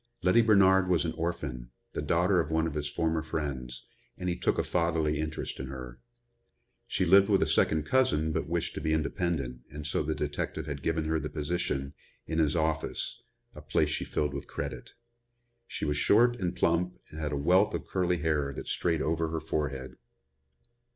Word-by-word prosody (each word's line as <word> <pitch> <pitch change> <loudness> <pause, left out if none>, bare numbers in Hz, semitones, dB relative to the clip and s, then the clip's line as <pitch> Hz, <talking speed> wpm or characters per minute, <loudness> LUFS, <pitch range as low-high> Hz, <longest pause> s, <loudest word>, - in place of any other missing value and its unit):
Letty 90 +6 +5
Bernard 95 -4 +5
was 90 -2 +2
an 80 - -2
orphan, 75 -8 -4 0.2
the - - -2
daughter 90 +2 +2
of 80 - 0
one 80 0 +1
of 80 - -2
his 75 -1 -2
former 80 +1 0
friends, 65 -6 -4 0.3
and 90 - -2
he 85 - 0
took - - 0
a - - +2
fatherly 80 -3 +1
interest 80 0 -4
in 65 - -4
her. 65 -2 -8 0.9
She 95 - 0
lived 95 +3 +6
with 100 -2 +4
a - - 0
second 80 -1 +2
cousin, 80 -13 +2
but - - -2
wished 85 0 -1
to - - -5
be 80 +1 +1
independent 75 -5 -2
and 75 +1 -8
so 75 - 0
the 75 +1 -1
detective 75 -1 -3
had 70 -2 -5
given 80 +1 0
her 80 0 +1
the 75 - -4
position, 75 -3 -2 0.3
in 80 0 -2
his 75 -1 +2
office, 80 -1 -1 0.3
a - - -10
place - - +1
she - - -1
filled 75 -1 -1
with 70 - -5
credit. - - -6 0.7
She - - -4
was 75 -1 0
short 120 +9 +4
and 90 -3 -1
plump 90 +2 +1
and 80 - -8
had 75 -1 -2
a 70 - -1
wealth 95 +8 +3
of - - -4
curly 90 -2 0
hair 75 -3 0
that - - -7
strayed 80 -3 0
over 80 +1 0
her 80 0 -2
forehead. 75 -5 -3
80 Hz, 190 wpm, -29 LUFS, 75-85 Hz, 0.9 s, lived